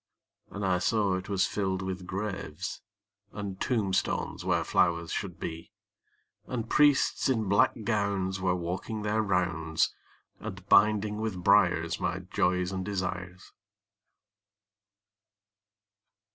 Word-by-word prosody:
And 100 0 -4
I 90 -1 +2
saw 105 0 +1
it 95 +2 -5
was 95 -2 +2
filled 95 -2 -1
with 90 -1 -5
graves, 95 -4 -4 0.5
And 100 -2 -6
tombstones 105 -7 0
where - - +1
flowers 85 -1 +1
should 95 -4 -4
be; 80 0 -6 0.7
And 115 -3 -3
priests 145 0 +3
in 110 -5 +1
black 100 +1 +4
gowns 100 -3 0
were 90 -1 +2
walking 90 +5 -4
their 105 +1 +1
rounds, 90 -5 0 0.5
And 95 0 -8
binding 105 0 +4
with 100 -5 -3
briars 85 -5 +3
my 90 0 -1
joys 90 0 0
and 95 -1 -3
desires. 90 -2 -4
95 Hz, 115 wpm, -29 LUFS, 90-105 Hz, 0.7 s, black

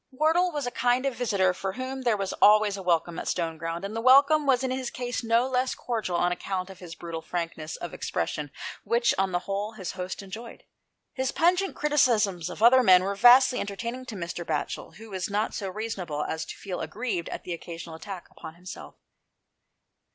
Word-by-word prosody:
Wardle 320 +6 +2
was 295 -4 -3
a 245 - -2
kind 245 +2 +1
of 275 - 0
visitor 200 -7 +1
for 190 +1 -4
whom 260 +2 -5
there 235 -4 +2
was 195 -1 -2
always 210 -1 +6
a 195 - -6
welcome 170 -2 0
at - - -6
Stoneground, 165 0 -2
and 205 +2 -5
the 225 - -2
welcome 280 +4 +6
was 260 -1 +3
in 260 - -1
his 255 -1 -2
case 245 0 -4
no 230 +2 +3
less 255 0 0
cordial 220 -7 -3
on 175 +1 +2
account 185 +1 -3
of 190 - -13
his 175 -2 -9
brutal 165 -1 -6
frank 170 0 -3
ness 155 0 -6
of 175 - -7
expression, 150 -1 -3 0.3
which, 235 +3 +2
on 190 -1 +1
the 175 - +1
whole, 200 +2 -3
his 195 -5 -5
host 185 +1 -5
enjoyed. 220 +5 -9 0.5
His 260 0 -1
pungent 360 +3 +2
criticisms 225 - +2
of 215 - -5
other 255 +2 +8
men 185 -6 +6
were 200 +1 -1
vastly 250 +4 +6
entertaining 235 +6 -5
to 225 - -6
Mr. 175 -1 -4
Batchel, 155 -3 -3
who 220 +1 -12
was 185 0 -3
not 210 +2 -1
so 200 - -3
unreasonable 185 -7 -4
as 160 0 -3
to - - -8
feel 185 -3 -5
aggrieved 210 -7 -3
at - - -7
an 180 - -5
occasional 170 0 -8
attack 185 +1 -8
upon 160 - -10
himself. 180 +1 -10
205 Hz, 200 wpm, -27 LUFS, 180-250 Hz, 0.5 s, other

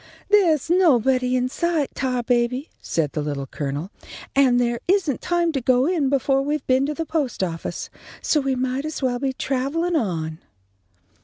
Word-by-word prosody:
"There's 340 -9 +4
nobody 260 - +3
in 250 0 +1
sight, 325 +1 -1
Tarbaby," 250 +1 0
said 155 -4 -1
the 155 - -2
Little 145 -2 -3
Colonel, 145 +6 -4 0.4
"and 260 -3 +4
there 240 -1 0
isn't 355 -8 +1
time 345 -1 +1
to 275 -4 -2
go 250 +1 +3
in 315 -5 +1
befo' 270 0 +2
we've 295 +1 -2
been 260 +2 +2
to 300 - -3
the 325 - -3
post 300 - -1
office, 165 -2 -4 0.3
so 305 - +1
we 270 -2 0
might 255 +2 -1
as 310 -2 -5
well 245 -1 0
be 270 0 0
travellin' 280 +7 -1
on." 165 - -2
265 Hz, 165 wpm, -23 LUFS, 240-305 Hz, 0.4 s, There's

